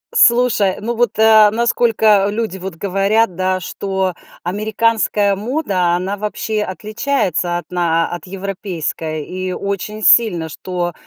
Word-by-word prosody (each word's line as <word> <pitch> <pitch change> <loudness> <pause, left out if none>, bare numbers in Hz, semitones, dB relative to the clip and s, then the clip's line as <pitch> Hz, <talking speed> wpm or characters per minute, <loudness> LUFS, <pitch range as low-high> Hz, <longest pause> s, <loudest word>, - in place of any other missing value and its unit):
Слушай, 235 - +4
ну 235 +3 -3
вот, 235 -2 0
а, 220 -1 +6
насколько 220 -3 +3
люди, 215 -3 -3
вот, 190 -1 -7
говорят, 195 +2 +1
да, 185 0 0
что 190 0 -2 0.3
американская 210 +1 +1
мода, 200 - 0
она 190 +3 -3
вообще 210 +1 -3
отличается 200 - -2
от 175 - -8
на 165 -2 +1
от 175 -3 -7
европейской, 180 -5 -4
и 185 0 -4
очень 200 +3 -4
сильно, 180 -9 +4
что 175 +1 -4
200 Hz, 125 wpm, -17 LUFS, 180-220 Hz, 0.3 s, а